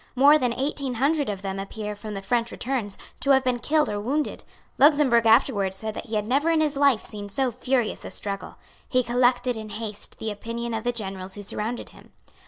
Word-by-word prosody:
More 285 +4 +7
than 250 -3 +1
eighteen 270 0 -2
hundred 285 +3 +1
of 200 -1 -4
them 195 0 -3
appear 210 +1 -5
from 210 0 -7
the 195 - -5
French 235 +2 0
returns 240 -6 -3 0.2
to 280 - -1
have 265 -1 +6
been 250 -1 0
killed 305 +4 +2
or 205 -1 -2
wounded. 285 +7 -2 0.4
Luxemburg 270 -5 +5
afterwards 215 -5 +4
said 220 +1 -4
that - - -7
he 220 - -3
had 210 -1 0
never 280 +8 +2
in 325 -1 +3
his 305 -2 +1
life 275 -5 +3
seen 205 -1 -7
so 255 +5 0
furious 250 -1 -1
a - - -6
struggle. 200 -1 -4 0.3
He 255 -1 +2
collected 245 0 +2
in 215 -1 -7
haste 210 -1 -5
the 220 - -3
opinion 230 +3 -5
of 220 +1 -3
the 245 - +2
generals 195 -4 -5
who 205 - -7
surrounded 220 +4 -4
him. - - -18
235 Hz, 210 wpm, -25 LUFS, 210-265 Hz, 0.4 s, More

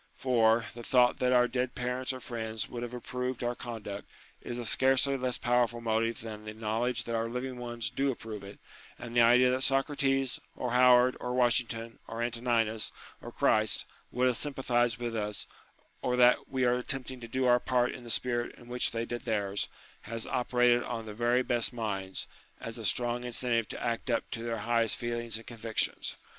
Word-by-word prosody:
For, 115 -3 +3
the 120 - -8
thought 125 +1 +4
that 125 0 +2
our 125 -1 +5
dead 125 0 -2
parents 125 +1 -2
or 130 - -6
friends 110 -3 -4
would 120 - -6
have 120 0 -5
approved 125 0 -3
our 120 0 0
con 120 -3 -7
duct 100 +1 -6 0.3
is 120 - -5
a 120 - -4
scarcely 135 +3 +3
less 130 -2 -1
powerful 120 -1 +2
motive 115 0 0
than 110 -1 -7
the 105 0 -6
knowledge 115 +2 -1
that 115 - -4
our 115 0 0
living 125 +1 -4
ones 120 -3 -3
do 135 +3 +1
approve 110 -5 -5
it: 100 +1 -10 0.4
and 120 0 -8
the 120 - +6
idea 125 +2 +6
that 130 +1 0
Socrates, 135 -1 +1 0.2
or 125 - -3
Howard 125 0 +6
or 125 0 -3
Washington, 120 -2 +1
or 115 +1 -3
Antoninus, 115 -2 0 0.3
or - - -8
Christ, 110 -1 +2 0.3
would 125 +1 +1
have 125 -2 +2
sympathized 120 -5 0
with 120 -1 -3
us, 105 -1 -3 0.6
or 125 - +1
that 125 0 +5
we 130 -1 +1
are 125 0 +3
attempting 130 0 -5
to 120 - -8
do 130 +3 0
our 125 0 +5
part 125 0 +1
in 125 - -9
the 120 - -9
spirit 120 +1 -1
in 120 - -15
which 125 0 +1
they 115 0 -2
did 120 0 -5
theirs, 100 -3 0 0.4
has 115 0 -3
operated 125 -1 +3
on 115 -2 -4
the 105 - -7
very 120 +3 +2
best 120 -2 0
minds, 100 -5 -3 0.3
as 115 0 -6
a 110 - -5
strong 120 +3 0
incentive 120 -2 0
to - - -5
act 115 +2 -2
up 115 - 0
to 115 - -4
their 115 -1 -2
highest 115 -1 +2
feelings 120 -2 -3
and 115 - -11
convictions. 115 -2 -2
120 Hz, 195 wpm, -30 LUFS, 115-125 Hz, 0.6 s, the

